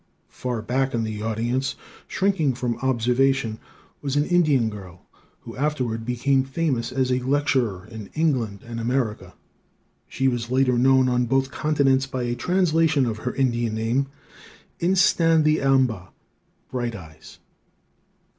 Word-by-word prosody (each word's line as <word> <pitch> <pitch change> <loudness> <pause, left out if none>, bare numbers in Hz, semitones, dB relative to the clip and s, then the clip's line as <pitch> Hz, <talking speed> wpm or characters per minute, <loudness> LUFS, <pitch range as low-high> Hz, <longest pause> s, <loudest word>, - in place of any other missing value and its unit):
Far 120 -4 -4
back 130 +3 0
in 115 - 0
the 110 -1 -4
audience, 120 +5 -1 0.3
shrinking 190 -9 +1
from 120 -1 -3
observation, 130 -1 +1 0.4
was 140 -1 -2
an 145 0 +2
Indian 155 -9 +3
girl, 95 -4 -9 0.4
who - - -10
afterward 125 -6 -2
became 130 +2 +1
famous 135 -4 -2
as 130 -1 0
a 125 - +2
lecturer 130 -7 0
in 110 -2 -9
England 125 -11 0
and 115 0 -6
America. 115 -2 -2 0.7
She 135 - -1
was 120 -2 -1
later 130 0 +2
known 130 +1 +4
on 125 -1 +1
both 135 +2 +1
continents 135 -3 +1
by 130 -2 -3
a 120 0 -1
translation 165 -3 +2
of 110 -2 -3
her 125 +2 -4
Indian 120 -4 0
name, 115 +5 0 0.7
In 180 +3 +2
sta 170 -4 +4
the 155 0 +3
am 135 -1 +4
ba, 100 -7 -6 0.6
Bright 120 -3 -2
Eyes. 80 -5 -13
130 Hz, 145 wpm, -23 LUFS, 115-140 Hz, 0.7 s, known